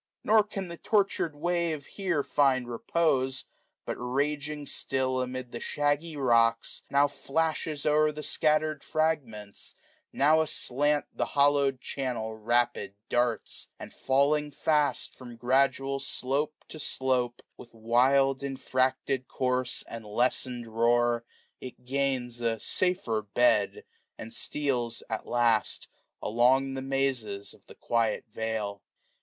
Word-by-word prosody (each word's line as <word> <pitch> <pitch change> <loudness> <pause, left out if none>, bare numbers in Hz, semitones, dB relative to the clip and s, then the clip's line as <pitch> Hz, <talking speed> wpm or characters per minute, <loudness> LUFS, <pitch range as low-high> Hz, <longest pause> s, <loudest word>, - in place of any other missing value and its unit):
Nor 215 0 +5
can 195 -2 -5
the 170 -1 -8
tortur'd 195 -7 +1
wave 170 -1 -1
here 185 -7 -1
find 130 -4 +2
repose; 130 +1 0 0.4
But, - - -3
raging 145 +3 -2
still 130 -1 -1
amid 125 -1 -5
the 120 - -5
shaggy 145 +4 -1
rocks^ 115 -4 +2
600 140 - -2
Now 145 +1 +6
flashes 155 +1 -2
o'er 150 0 +4
the 150 0 -7
scattered 155 -1 +1
fragments, 130 -11 -2 0.4
how 155 +3 +5
Aslant 145 -1 0
the - - -1
hollowed 140 -2 +3
channel 120 -5 -3
rapid 120 -2 0
darts; 120 -2 -1
And - - -10
felling 145 +3 +2
fast 145 -1 0
from 120 -2 -11
gradual 135 +2 +1
slope 140 +2 -2
to 155 - -9
slopCj 125 -4 0 0.2
With 120 - -13
wild 130 +4 +3
infracted 130 -1 -1
course, 125 -1 -1
and 115 -1 -7
lessened 120 +2 -1
roar, 120 +1 +2 0.3
It 125 -1 -10
gains 130 -3 -1
a 115 -1 0
safer 180 - 0
bed; 105 0 +2 0.3
and 115 - -8
steals, 125 -6 -2
at 110 - -3
last, 120 -3 +1
605 - - -25
Along 130 +4 +3
the 135 - -4
mazes 130 -7 -2
of - - -23
the - - -13
quiet 115 -2 0
vale. 110 -3 -3
130 Hz, 125 wpm, -28 LUFS, 120-145 Hz, 0.4 s, Now